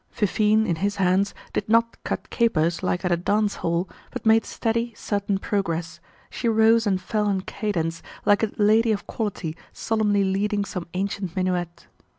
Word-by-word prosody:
Fifine, 215 +1 +2
in 170 -5 0
his 200 +4 -1
hands, 190 +1 +2 0.2
did - - -2
not 230 +1 +3
cut - - -4
capers, 170 -8 +1
like 180 -1 -1
at 180 - +1
a - - +5
dance 205 +4 0
hall, 170 +2 -1 0.2
but 250 -3 -7
made 225 0 +5
steady, 230 0 -1
certain 200 -1 -1
progress; 170 -5 -2 0.3
she 235 - -1
rose 225 0 +4
and 190 -2 +2
fell 210 +1 -1
in 195 -2 0
cadence, 165 -5 -3 0.2
like 205 0 +4
a 220 -2 0
lady 220 +2 +4
of 200 - -4
quality 185 -7 -3 0.2
solemnly 210 -3 +1
leading 200 +2 0
some 180 -3 -5
ancient 190 -2 -3
minuet. 180 -2 -2
200 Hz, 165 wpm, -24 LUFS, 180-220 Hz, 0.3 s, a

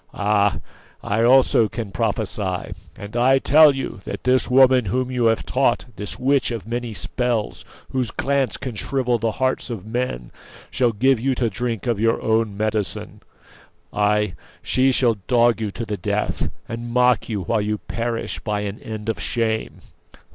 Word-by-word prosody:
Ah! 105 -1 +2 0.5
I 105 +2 0
also 120 -2 +4
can 110 -3 -5
prophecy; 85 - -2 0.2
and 100 +2 -9
I 130 +3 +4
tell 145 +2 +6
you 135 -7 -5
that - - -6
this 130 +1 +2
woman 130 -1 +5
whom 130 +6 -1
you 125 -2 0
have 115 0 +2
taught, 130 -2 +1
this 105 - -4
witch 135 +1 +2
of 115 -5 -5
many 120 +1 -4
spells, 115 +3 -2 0.3
whose 130 -3 -1
glance 135 0 0
can 130 -3 -5
shrivel 125 +2 -1
the 115 0 -1
hearts 130 +1 -1
of 110 -5 -6
men, 110 - -3 0.4
shall 120 -2 +2
give 130 +3 +2
you 130 +2 0
to 120 -3 0
drink 115 +1 -3
of 120 -4 0
your 115 +1 +2
own 110 -2 0
medicine; 110 -2 -2 0.7
ay, 105 -2 +1 0.3
she 130 +1 +3
shall 120 -4 +2
dog 120 -2 +3
you 110 - -1
to 115 +4 -5
the 105 -1 -4
death, 85 - -2 0.2
and 115 +1 -6
mock 125 -1 +2
you 105 -3 -2
while 110 +5 0
you 105 +1 -1
perish 115 +2 -4
by 105 -2 -2
an 105 0 -5
end 110 -1 -7
of 110 -5 -2
shame!" 110 +3 -2
115 Hz, 170 wpm, -22 LUFS, 105-125 Hz, 0.7 s, tell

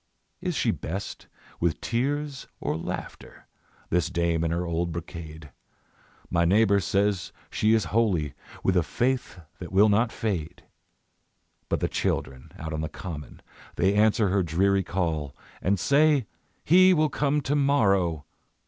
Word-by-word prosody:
Is - - -2
she - - +2
best 95 +6 -6 0.3
with 85 -1 0
tears 140 +4 -2
or 75 - -2
laughter, 80 - -7 0.5
This 90 0 +1
dame 85 -2 0
in 85 - 0
her 85 +2 -1
old 85 0 -1
brocade? 80 -2 -8 0.8
My 85 -1 +3
neighbour 100 +3 +4
says 100 -1 0 0.2
she 110 +1 +3
is 110 -5 +1
holy, 90 -11 +1 0.3
With 95 - +2
a 90 - +5
faith 120 - -1 0.2
that 90 - -8
will 100 +3 +5
not 110 +3 +2
fade. 90 -5 -3 1.1
But - - 0
the - - +2
children 65 -1 -3
out 80 +1 -6
on 75 - -2
the 80 - -3
common 75 -4 -8 0.3
They 95 +3 +2
answer 105 0 +3
her 95 +1 +2
dreary 95 +4 +2
call, 80 -6 -2 0.3
And 100 +1 +1
say: 145 - +3 0.4
"He 185 +3 +6
will 155 -1 +2
come 145 +2 +1
to 145 +1 -1
morrow!" 100 - +2
95 Hz, 145 wpm, -26 LUFS, 85-115 Hz, 1.1 s, He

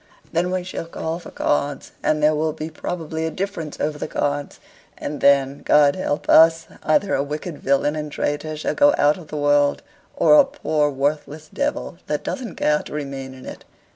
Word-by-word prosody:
Then 175 +2 +1
we 185 0 -1
shall 180 -2 -6
call 165 0 -4
for - - -11
cards, 145 -1 -1
and 155 -1 +1
there 155 +1 +5
will 155 0 0
be 160 +1 -6
probably 160 -1 -4
a - - -1
difference 170 -3 -5
over 150 0 -2
the - - -3
cards 145 -1 -2 0.4
and 145 0 -5
then, 140 0 +3
God 145 -1 +4
help 145 -5 -2
us! 165 0 +6 0.2
either 190 +6 +2
a 135 - +2
wicked 150 +3 -5
villain 140 +2 +1
and 150 -1 -4
traitor 155 +2 -2
shall 155 - -2
go 290 0 +5
out 150 +4 +3
of 165 - -12
the 150 - -6
world, 145 - +2 0.3
or 300 - +6
a - - +8
poor 155 - 0
worthless 145 +2 -3
devil, 285 +1 -2
that - - -2
doesn't 245 -9 -5
care 150 0 +2
to - - -10
remain 135 -3 -5
in 130 - -12
it. - - -9
150 Hz, 195 wpm, -22 LUFS, 145-165 Hz, 0.4 s, a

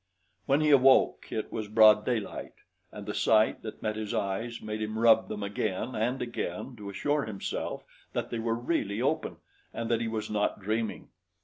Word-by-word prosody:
When 140 +3 +3
he 150 -1 +3
awoke, 135 -1 +5
it 110 - -3
was 110 -2 -3
broad 105 0 +6
daylight, 115 -5 -3 0.4
and - - -9
the - - -4
sight 110 -1 +3
that 110 - -8
met 110 -1 -1
his 110 -1 -3
eyes 110 +4 -2
made 110 0 -5
him 110 0 -3
rub 115 0 +5
them 105 -1 -4
again 100 +3 -2
and 120 +4 -1
again 120 0 -4
to 100 -2 -7
assure 145 +8 0
himself 105 -3 -4 0.3
that - - -3
they 115 - -2
were 115 0 0
really 115 -4 -1
open 155 +5 -1 0.3
and 115 0 -4
that 115 0 +2
he 115 - -1
was 110 -1 -3
not 105 -1 -1
dreaming. 110 +2 -3
110 Hz, 185 wpm, -29 LUFS, 105-120 Hz, 0.4 s, broad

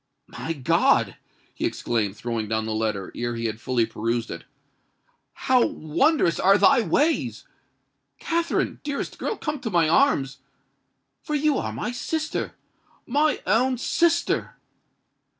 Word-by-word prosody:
"My 165 - -5
God!" 135 -6 +2 0.4
he - - -6
exclaimed, 105 -4 -1
throwing 115 -1 -3
down 110 0 -1
the 110 - -2
letter, 110 -3 -2
ere 120 0 -3
he 115 0 -4
had 110 0 -3
fully 125 -3 +1
perused 115 +1 -2
it: 85 - -7 1.0
"how 255 -2 +5
wondrous 170 - +1
are 195 +2 +5
thy 270 +3 +5
ways! 300 +8 0 0.7
Katherine, 335 0 -1
dearest 285 -1 -4
girl—come 300 -9 -3
to 230 - -4
my 170 -5 +3
arms—for 135 - -2
you 295 0 +2
are - - -3
my - - -3
sister—my 305 0 -3
own 250 +4 +2
sister!" 340 +7 +1
165 Hz, 120 wpm, -24 LUFS, -, 1.0 s, how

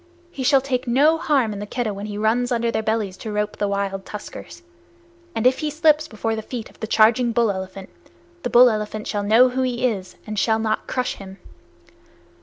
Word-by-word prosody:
He 275 - -7
shall 270 +1 +4
take 260 -1 -2
no 295 +7 +4
harm 265 -9 +1
in 200 - -6
the 205 - -6
Keddah 230 -2 -2
when 200 +1 -6
he 205 -1 -5
runs 235 +4 +1
under 235 -1 +1
their - - -1
bellies 220 -3 -1
to 220 - -6
rope 210 0 -2
the 205 - 0
wild 200 -1 -2
tuskers; 210 - -9 0.7
and 225 - -1
if 255 +1 +4
he 305 - -1
slips 310 0 +3
before 225 +1 -3
the 220 - -4
feet 230 0 -7
of - - -25
the 220 - -4
charging 230 +2 +3
bull 230 -3 +2
elephant, 190 0 -7 0.5
the 245 - -3
bull 245 0 +7
elephant 215 0 -4
shall 205 - -2
know 225 +5 +5
who 255 +1 -2
he 250 -1 0
is 195 -6 -2
and 215 -1 -3
shall 220 +1 +2
not 220 -1 -2
crush 255 -1 -2
him. 195 -1 -10
225 Hz, 210 wpm, -22 LUFS, 210-250 Hz, 0.7 s, bull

